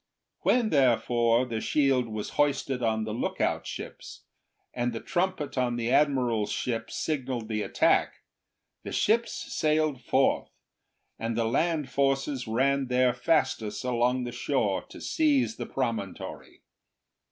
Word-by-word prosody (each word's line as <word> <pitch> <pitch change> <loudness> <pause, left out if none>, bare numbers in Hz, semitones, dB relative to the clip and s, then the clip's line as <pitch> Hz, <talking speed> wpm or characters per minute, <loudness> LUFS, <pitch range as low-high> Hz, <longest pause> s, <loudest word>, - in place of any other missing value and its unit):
When, 235 -3 +2
therefore, 120 -3 +3
the 115 -3 -3
shield 135 -4 +2
was 110 -1 -5
hoisted 140 -3 0
on 110 -1 +1
the 110 0 -4
lookout 115 - -1
ships, - - -8 0.5
and 120 -1 -1
the 115 - -4
trumpet 175 -6 -1
on 120 -1 +1
the 120 0 -1
admiral's 130 -6 +2
ship 115 -2 -2
signalled 130 -6 -3
the 110 -1 -2
attack, - - +1 0.6
the - - -7
ships 230 +2 +2
sailed 155 -3 0
forth, - - +1 0.7
and 115 0 -2
the 115 - +1
land 150 +5 +1
forces 135 -1 0
ran 135 +4 +1
their 125 0 +3
fastest 130 -10 0
along 125 0 +1
the 120 - -4
shore 120 - 0
to - - -11
seize 290 -7 +1
the - - -5
promontory. - - -4
125 Hz, 130 wpm, -28 LUFS, 115-145 Hz, 0.7 s, therefore